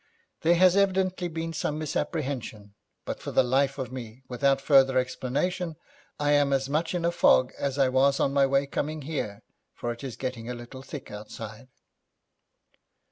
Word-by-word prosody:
There 170 +2 +4
has 185 +1 +5
evidently 190 -2 +2
been 165 0 -4
some 150 0 -2
misapprehension, 135 - -3 0.3
but - - -4
for - - -6
the - - +4
life 135 +2 +1
of 130 -2 -4
me, 125 -1 -8
without 135 +2 +2
further 135 -2 +5
explanation, 150 +7 -1 0.4
I 145 0 +2
am 145 -1 +4
as 135 0 +1
much 160 +5 -1
in 170 -1 -1
a 170 - +3
fog 130 -6 +4
as 140 -1 -1
I 135 -2 +4
was 135 +2 +3
on 140 - +1
my 140 -1 +4
way 135 +1 +2
coming 150 +2 -3
here, 130 -9 -4 0.3
for 120 - -3
it 120 +3 -8
is 130 -4 -5
getting 125 -3 -4
a 125 - -3
little 120 +2 -9
thick 140 0 -8
outside.' 110 +3 -8
135 Hz, 175 wpm, -27 LUFS, 125-155 Hz, 0.4 s, has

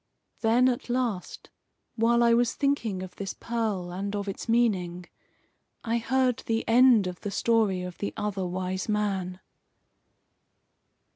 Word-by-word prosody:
Then, 235 +3 +4
at 245 -1 -2
last, 240 -7 -3 0.4
while 235 +1 +3
I 235 0 +5
was 235 0 +2
thinking 235 -10 -1
of 185 - -10
this 195 -1 -5
pearl, 215 -7 -2
and 200 +2 -3
of 205 0 -3
its 195 +4 -6
meaning, 185 -7 +1 0.8
I 230 +1 0
heard 255 +1 +1
the 225 0 -1
end 240 -3 +6
of 180 -1 -5
the 205 - -3
story 210 -4 +1
of 180 -1 -8
the 200 - -2
Other 200 -3 -2
Wise 185 +2 -3
Man. 190 -3 -1
210 Hz, 140 wpm, -27 LUFS, 185-235 Hz, 0.8 s, end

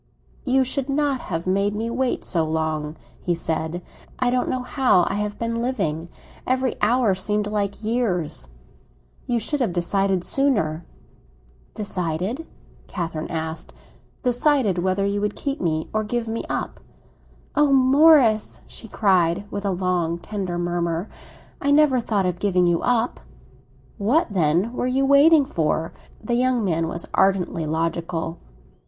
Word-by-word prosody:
"You 265 0 +3
should 265 +1 -1
not 280 -1 +1
have 165 -6 -4
made 200 +2 +1
me 225 +2 -2
wait 255 +1 -1
so 165 -3 0
long," 155 -1 -2 0.3
he 175 - 0
said. 165 +1 -3 0.3
"I 250 -1 +1
don't 250 0 0
know 255 -1 -2
how 250 - +3
I - - -1
have 210 0 -3
been 230 0 -2
living; 175 -10 -2 0.4
every 255 -1 +1
hour 230 -1 +3
seemed 205 +3 -1
like 205 0 -2
years. 185 - -1 0.8
You 240 - +1
should 260 +7 -1
have 235 -9 0
decided 190 +1 0
sooner." 180 - +1 0.9
"Decided?" 195 - -2 0.4
Catherine 165 -3 -4
asked. 160 0 -5 0.5
"Decided 250 - +2
whether 190 +2 0
you 200 0 -1
would 210 0 -1
keep 280 0 -3
me 160 -2 -1
or 215 0 +1
give 235 +2 -2
me 225 +1 -3
up." - - -3 0.8
"Oh, 295 -1 +4
Morris," 265 -4 +5
she 225 - -11
cried, 190 -3 +2
with 200 0 -4
a - - +1
long 180 -2 0
tender 185 -1 -4
murmur, 175 +1 -2 0.5
"I 280 - 0
never 285 -3 +4
thought 210 -4 0
of 180 -1 -2
giving 185 -3 +2
you 170 -1 +2
up!" 240 -1 0 0.8
"What, 235 +6 +2
then, 175 +6 +1
were 250 - -1
you 265 +2 +1
waiting 285 +2 +6
for?" 160 - -1 0.3
The 240 - -2
young 245 -2 +2
man 165 -3 0
was 170 +1 -3
ardently 185 -4 +1
logical. 165 +1 -2
200 Hz, 145 wpm, -23 LUFS, 170-250 Hz, 0.9 s, waiting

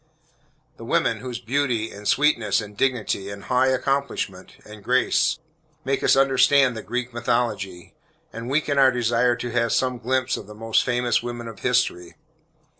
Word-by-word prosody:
The - - -11
women, 115 -2 0
whose 125 0 -5
beauty, 120 -3 -1
and 105 +1 -8
sweetness, 125 -8 +2
and 105 -2 -8
dignity, 110 -5 -1
and 100 0 -8
high 130 +1 +2
accomplishment, 130 -8 -2
and 105 -1 -12
grace, 130 +5 +2 0.5
make 135 +1 0
us - - +5
understand 135 -1 +4
the 110 - -5
Greek 125 +3 -4
mythology, 110 -7 -2 0.4
and 115 +1 -6
weaken 145 0 +1
our 135 -1 +7
desire 120 0 +1
to 120 0 -5
have 115 0 +1
some 125 -2 0
glimpse 130 +2 0
of 100 - -9
the 105 - -11
most 115 +1 +1
famous 120 -1 +1
women 120 0 -6
of 115 -3 -9
history. 120 -9 0
120 Hz, 160 wpm, -23 LUFS, 110-130 Hz, 0.5 s, our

